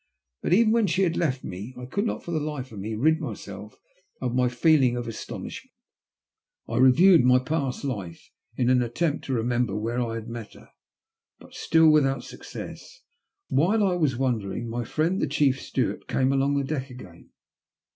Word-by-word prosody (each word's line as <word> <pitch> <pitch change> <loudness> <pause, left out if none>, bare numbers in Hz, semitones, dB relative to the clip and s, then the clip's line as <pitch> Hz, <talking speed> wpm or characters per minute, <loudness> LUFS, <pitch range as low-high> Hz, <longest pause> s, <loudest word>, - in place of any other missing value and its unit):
But - - -2
even 215 +3 +5
when 225 -2 +3
she 190 +3 +1
had 170 -3 +1
left 135 -6 -1
me 100 +8 -7
I 125 - -7
could 200 - -1
not - - -4
for 170 - -6
the 160 - 0
life 145 -4 -5
of 105 - -8
me 110 +3 -4
rid 155 +8 +2
myself 105 - -8 0.4
of 125 -2 -2
my 125 0 +2
feeling 125 -1 +3
of 120 -1 -4
astonishment. 115 - -7 0.9
I - - -3
reviewed 155 +6 +6
my 125 0 +5
past 135 0 -2
life 100 -11 -6 0.2
in 125 0 +2
an 125 -1 +4
attempt 145 +6 -1
to 135 - -2
remember 120 -2 0
where 115 +3 -2
I 115 -2 -2
had 115 0 -6
met 115 -2 -8
her, - - -16 0.7
but - - -17
still 160 0 +3
with 150 -3 +4
out 135 -2 -2
success. 485 0 -10 0.5
While 195 +10 +2
I 190 -2 +2
was 150 -8 0
wondering, 120 -3 -2
my 120 +1 -3
friend 165 - 0
the - - +1
chief 140 -2 +1
steward - - -2
came 130 +1 +1
along 140 +1 +1
the 140 - 0
deck 135 -1 -3
again. 95 -9 -13
130 Hz, 185 wpm, -25 LUFS, 120-155 Hz, 0.9 s, reviewed